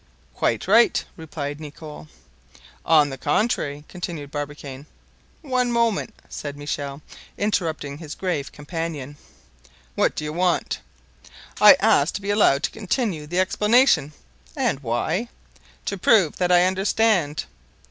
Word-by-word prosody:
"Quite 115 +6 -1
right," 230 +4 +4
replied 145 -3 -6
Nicholl. 150 0 -10 0.8
"On 150 -3 +4
the 135 - -7
contrary," 150 -4 0
continued 170 -5 -6
Barbicane. 145 -1 -6 0.6
"One 255 -4 0
moment," 230 -2 0
said 145 -1 -6
Michel, 145 0 -5 0.3
interrupting 160 -8 -2
his 155 -3 -7
grave 170 -7 -3
companion. 150 -2 -5 0.8
"What - - +1
do - - -4
you 150 0 -4
want?" 180 +1 0 0.8
"I - - +10
ask 140 +3 +3
to - - -3
be 200 - -1
allowed 155 -9 +3
to - - 0
continue 205 - -2
the 175 +4 -1
explanation." 210 - +3 0.4
"And 135 - 0
why?" 155 - -1 0.6
"To 200 - -3
prove 190 -5 +4
that 180 -1 +1
I 175 0 +6
understand." 190 -4 +1
160 Hz, 125 wpm, -23 LUFS, 145-200 Hz, 0.8 s, I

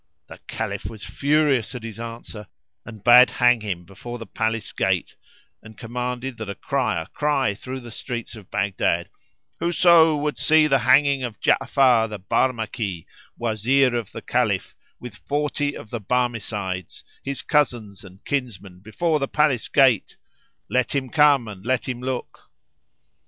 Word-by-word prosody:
The - - -11
Caliph - - -4
was 110 -2 -10
furious 140 -5 +1
at 120 - -7
his 115 -1 -8
answer 115 -3 -8 0.4
and 110 -3 -10
bade 125 +2 +8
hang 120 -2 +3
him 90 -5 -4
before 120 +7 -8
the 115 - -8
palace 110 -1 -2
gate - - -1 0.5
and 110 -1 -14
commanded 125 +2 -4
that 110 -2 -6
a 100 - -4
crier 110 -12 -1
cry 145 -7 +1
through 130 +6 -7
the 120 -1 -10
streets 120 0 -6
of 105 -4 -13
Baghdad, 95 -3 -1 0.5
"Whoso 170 -2 +5
would 150 0 -2
see 155 0 +5
the 135 -3 +3
hanging 135 +3 +4
of 120 -5 -5
Ja'afar, 125 -5 +3
the 105 - -5
Barmaki, 110 -3 -1 0.3
Wazir 120 +4 +2
of 115 -4 -3
the - - -8
Caliph, - - 0 0.3
with 120 -4 -9
forty 145 +1 -2
of 105 - -12
the 120 - -3
Barmecides, 105 -6 -2
[FN#356] - - -33
his 140 0 -3
cousins 120 - 0
and 95 0 -15
kinsmen, 105 -10 -4
before 150 - -1
the 135 - -1
palace 150 -6 +1
gate, 130 -7 +3 0.5
let 125 +4 0
him 130 -2 -1
come 145 -5 +4
and 100 -3 -9
let 120 -1 -1
him 125 -2 -3
look!" 130 -1 -5
120 Hz, 155 wpm, -23 LUFS, 110-135 Hz, 0.5 s, bade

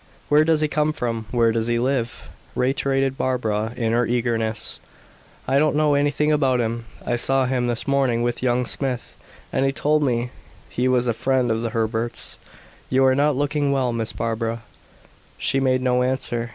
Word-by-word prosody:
"Where 150 +1 +5
does 160 -1 +2
he 155 - +2
come 150 0 0
from? 115 -5 -3
Where 115 -2 +3
does 115 0 -1
he 120 0 +1
live?" 125 -1 -1 0.3
reiterated 135 +1 0
Barbara 110 -4 -1
in 115 -2 0
her 120 0 +2
eagerness. 115 -2 -1 0.7
"I 135 +2 +3
don't 155 0 +2
know 150 -1 +3
anything 145 +1 +2
about 135 -4 +2
him. 115 0 -2 0.2
I 120 - 0
saw 135 +2 +2
him 125 -1 0
this 120 +2 -3
morning 135 -4 +2
with 120 0 -1
young 125 0 +1
Smith, 130 -1 -3 0.4
and - - +1
he 135 - +2
told 150 +2 +1
me 125 -3 0 0.4
he 125 +1 0
was 125 -1 +2
a 120 - +2
friend 130 0 +1
of 110 0 0
the 115 - -2
Herberts. 115 +1 -1 0.5
You 135 +1 +3
are 130 - +5
not 145 +1 +2
looking 145 +1 0
well, 130 -3 +1
Miss 115 -1 -2
Barbara." 115 0 -3 0.7
She 135 - 0
made 130 -1 +1
no 125 -1 +2
answer. 125 -2 -1
125 Hz, 180 wpm, -22 LUFS, 115-135 Hz, 0.7 s, Where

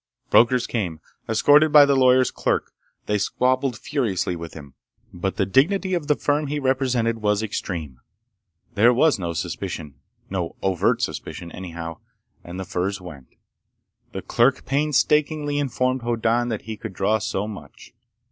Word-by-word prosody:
Brokers 120 +1 +4
came, 90 -9 -3 0.3
escorted 145 +7 +5
by 145 -1 +9
the 140 -1 +2
lawyer's 130 -1 +4
clerk. - - -1 0.3
They 105 0 0
squabbled 130 +4 0
furiously 110 - -1
with 85 -1 -8
him. 70 -4 -11 0.4
But 95 +2 -3
the - - +2
dignity 185 - +2
of 170 -5 -1
the 150 - +3
firm 145 +1 0
he 145 +1 -2
represented 130 -4 0
was 105 0 +1
extreme. 80 - -5 0.7
There 120 +4 +4
was 150 -2 +3
no 85 -2 -3
suspicion—no 80 +4 -6
overt 95 -3 +1
suspicion 85 -1 -5
anyhow—and 85 0 -10
the 95 - -4
furs 95 +3 -2
went. 75 -8 -11 0.8
The 95 - -6
clerk 120 +3 +2
painstakingly 150 +1 +1
informed 130 -1 0
Hoddan 120 0 0
that 110 -3 -4
he 110 -1 -6
could 95 - -7
draw 100 +4 +1
so 105 -1 -2
much. 100 -10 -11
115 Hz, 140 wpm, -23 LUFS, 95-135 Hz, 0.8 s, by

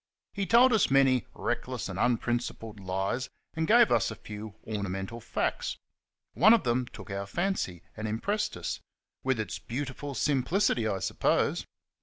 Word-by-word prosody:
He 200 -2 -2
told 245 +2 +6
us 220 - +4
many 135 -2 +4
reckless 120 0 -2
and 95 0 -5
unprincipled 120 -2 -1
lies, 95 +6 -2 0.2
and 160 0 -1
gave 235 +1 +6
us - - +3
a 110 - -6
few 105 -1 -8
ornamental 100 +1 -3
facts. - - -2 0.6
One 215 +7 +7
of 230 - 0
them 120 +1 +1
took 105 - -10
our 100 0 -3
fancy, 170 - -2
and 110 +1 -4
impressed 200 - -1
us 85 - -3 0.4
with 130 -3 +1
its 110 - -3
beautiful 135 +2 -5
simplicity, 135 - +2
I 100 -3 0
suppose. - - +1
120 Hz, 150 wpm, -29 LUFS, 105-145 Hz, 0.6 s, One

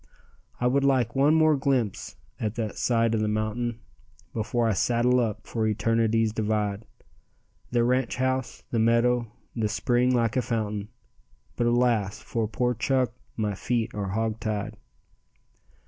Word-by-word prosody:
"I 125 - -1
would 135 +3 +3
like 130 -4 +2
one 145 +3 +4
more 155 -1 +5
glimpse 130 -7 -1 0.2
at 110 0 -2
the 110 -3 -3
side 115 -2 +1
of 110 - +1
the 105 - +1
mountain, 110 +2 -2 0.5
Before 115 +1 0
I 110 - +2
saddle 120 +5 +2
up 110 -4 -2
for 110 -2 -1
Eternity's 115 +1 +1
divide; 105 -1 -1 0.8
The 120 -1 +2
ranch 125 0 +1
house, 130 0 -2
the 115 - +1
meadow, 115 0 +2 0.2
the 110 -3 0
spring 125 +3 +2
like 115 -3 +1
a 130 - +3
fountain, 105 -4 -2 0.7
But, 120 - +1
alas 120 -4 +2
for 115 -2 -2
poor 125 +3 0
Chuck, 125 +2 +1 0.3
my 105 -2 0
feet 115 +3 -1
are 100 -2 -3
hogtied." 110 -1 -2
115 Hz, 145 wpm, -26 LUFS, 110-125 Hz, 0.8 s, more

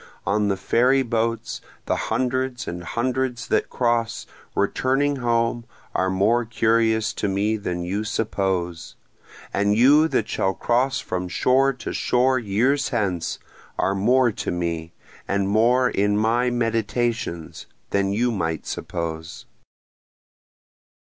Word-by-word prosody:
On 105 +1 +1
the 100 -1 0
ferry 130 +7 +3
boats 115 -1 -2 0.2
the - - 0
hundreds 130 0 -1
and 85 0 -5
hundreds 125 +4 -2
that - - +1
cross, 120 -2 0 0.3
returning 140 +2 +1
home, 120 -1 0 0.3
are 95 - +1
more 105 +6 +2
curious 110 -1 +1
to 105 - -2
me 100 +3 0
than 90 -4 -3
you 100 +4 -2
suppose, 95 -6 -2 0.6
And 100 +1 +2
you 145 +6 +6
that - - 0
shall 95 0 0
cross 125 +3 +1
from 90 0 -3
shore 130 +9 +3
to 125 - -6
shore 130 +1 +2
years 120 +7 +1
hence 95 -8 -1 0.4
are 95 - +1
more 120 +5 +3
to 110 - -4
me, 85 -2 -3 0.4
and 100 0 0
more 120 +5 +3
in 105 -2 +1
my 115 +3 +2
meditations, 115 -6 -2 0.2
than 100 0 +1
you 120 +4 +1
might 80 -7 -2
suppose. 85 -1 -5
115 Hz, 125 wpm, -23 LUFS, 95-125 Hz, 0.6 s, you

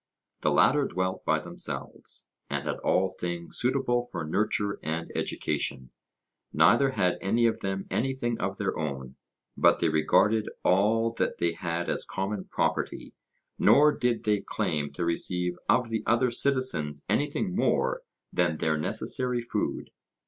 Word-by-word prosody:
The - - +2
latter 145 +1 +4
dwelt 95 0 -2
by - - +3
themselves, - - -4 0.2
and - - -3
had - - -2
all 95 0 +1
things 85 -2 -1
suitable 125 -1 +1
for 90 -9 -6
nurture 100 +4 -1
and 80 +1 -4
education; 65 -2 -2 0.6
neither 140 -1 +4
had 90 -7 +1
any 115 +5 +2
of 115 - +1
them 95 0 -3
anything 120 -2 -1
of 95 +1 -2
their 100 - -2
own, 65 -4 -5 0.4
but - - +4
they 85 - +1
regarded 100 +8 +2
all 110 +5 +3
that - - 0
they 85 -1 0
had 85 0 -3
as - - -1
common 95 0 -4
property; - - -2 0.5
nor 150 +2 +6
did 120 -4 -1
they 105 -1 +2
claim 75 -2 -2
to 85 +4 -3
receive 90 +1 0
of 120 +1 +2
the 110 - -1
other 120 +2 +3
citizens 120 - +1
anything 145 - 0
more - - +1 0.3
than 85 -3 +1
their 80 -1 0
necessary 125 +9 0
food. 120 - -3
100 Hz, 145 wpm, -27 LUFS, 85-120 Hz, 0.6 s, nor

